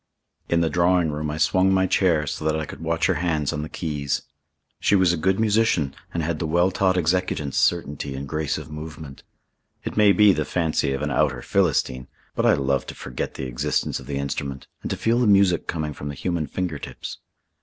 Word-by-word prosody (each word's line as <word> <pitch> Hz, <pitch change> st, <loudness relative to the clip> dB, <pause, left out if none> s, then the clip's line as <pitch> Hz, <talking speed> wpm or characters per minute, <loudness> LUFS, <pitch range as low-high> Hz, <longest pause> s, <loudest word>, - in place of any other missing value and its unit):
In 85 Hz, 0 st, +3 dB
the 80 Hz, -, +2 dB
drawing 90 Hz, -2 st, +3 dB
room 75 Hz, +1 st, -3 dB
I 75 Hz, -, -3 dB
swung 95 Hz, +4 st, +3 dB
my 95 Hz, 0 st, +3 dB
chair 85 Hz, -5 st, +2 dB
so 75 Hz, +2 st, -4 dB
that 80 Hz, 0 st, +1 dB
I 80 Hz, -, -3 dB
could 70 Hz, -, -10 dB
watch 80 Hz, 0 st, 0 dB
her -, -, +3 dB
hands 80 Hz, -5 st, 0 dB
on 75 Hz, -, -2 dB
the 75 Hz, -, -6 dB
keys. 75 Hz, -4 st, -2 dB, 0.6 s
She -, -, +3 dB
was 95 Hz, -3 st, +4 dB
a -, -, +1 dB
good 95 Hz, +4 st, +1 dB
musician 105 Hz, -10 st, +2 dB, 0.2 s
and 85 Hz, -, -2 dB
had 80 Hz, 0 st, -2 dB
the 80 Hz, -, -1 dB
well 85 Hz, +4 st, +2 dB
taught 95 Hz, 0 st, +2 dB
executant's 85 Hz, -5 st, 0 dB
certainty 75 Hz, -5 st, 0 dB
and 70 Hz, +1 st, -5 dB
grace 75 Hz, 0 st, -1 dB
of 80 Hz, -, -9 dB
movement. 75 Hz, -2 st, -8 dB, 0.6 s
It -, -, -5 dB
may 105 Hz, -1 st, +6 dB
be 105 Hz, -1 st, +6 dB
the 75 Hz, -, 0 dB
fancy 80 Hz, -4 st, 0 dB
of 70 Hz, +2 st, -3 dB
an 75 Hz, -, -1 dB
outer 65 Hz, -, +1 dB
Philistine, 70 Hz, -9 st, +1 dB, 0.3 s
but -, -, +1 dB
I -, -, +6 dB
love 70 Hz, -1 st, 0 dB
to -, -, -7 dB
forget 65 Hz, -2 st, -5 dB
the 65 Hz, -, -4 dB
existence 60 Hz, -1 st, -1 dB
of -, -, -12 dB
the 70 Hz, -1 st, -3 dB
instrument 70 Hz, -1 st, -4 dB, 0.2 s
and -, -, -5 dB
to -, -, -2 dB
feel 115 Hz, +2 st, +2 dB
the 125 Hz, -, +3 dB
music 100 Hz, -4 st, +4 dB
coming 75 Hz, -3 st, -2 dB
from 70 Hz, +1 st, -7 dB
the 70 Hz, -, -5 dB
human 85 Hz, 0 st, -2 dB
finger 85 Hz, -1 st, -3 dB
tips. -, -, -8 dB
80 Hz, 220 wpm, -24 LUFS, 75-90 Hz, 0.6 s, may